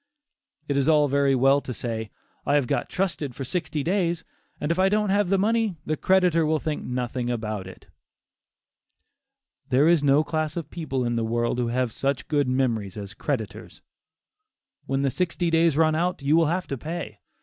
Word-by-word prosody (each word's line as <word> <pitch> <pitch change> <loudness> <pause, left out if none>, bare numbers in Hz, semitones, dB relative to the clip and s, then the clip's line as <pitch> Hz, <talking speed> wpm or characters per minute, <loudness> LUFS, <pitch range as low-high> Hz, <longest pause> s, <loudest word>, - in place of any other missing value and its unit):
It 140 - 0
is 140 +2 +2
all 150 -2 +5
very 140 0 +2
well 135 +2 +4
to 125 - -6
say, 110 0 -4 0.3
"I 145 - +1
have 145 -3 +3
got - - -1
trusted 155 -9 -2
for 135 - -5
sixty 155 -1 -2
days, 175 -1 0 0.4
and 150 - -1
if 170 - -1
I 190 +1 +4
don't 210 -1 +1
have 200 -2 +2
the 195 - +3
money, 220 0 +1
the 155 - 0
creditor 180 -2 +3
will 155 0 +2
think 150 0 -3
nothing 125 0 -3
about 110 -5 -3
it." 95 - -12 1.8
There 135 +4 +4
is 170 -3 +4
no 140 +2 +4
class 155 0 -2
of 160 -3 -5
people 135 -7 -2
in 120 0 -1
the 115 - 0
world 120 +2 0
who 120 - 0
have 125 0 0
such 135 +3 -2
good 145 -3 +1
memories 115 -7 -1
as 100 0 -7
creditors. 115 -8 -5 1.0
When 135 0 0
the 135 - +1
sixty 170 +3 -1
days 165 -2 +3
run 155 -1 +4
out, 170 -1 -1
you 145 +3 +3
will 165 -1 +4
have 180 +3 -1
to 135 - -3
pay. 155 -10 -6
145 Hz, 190 wpm, -25 LUFS, 125-170 Hz, 1.8 s, all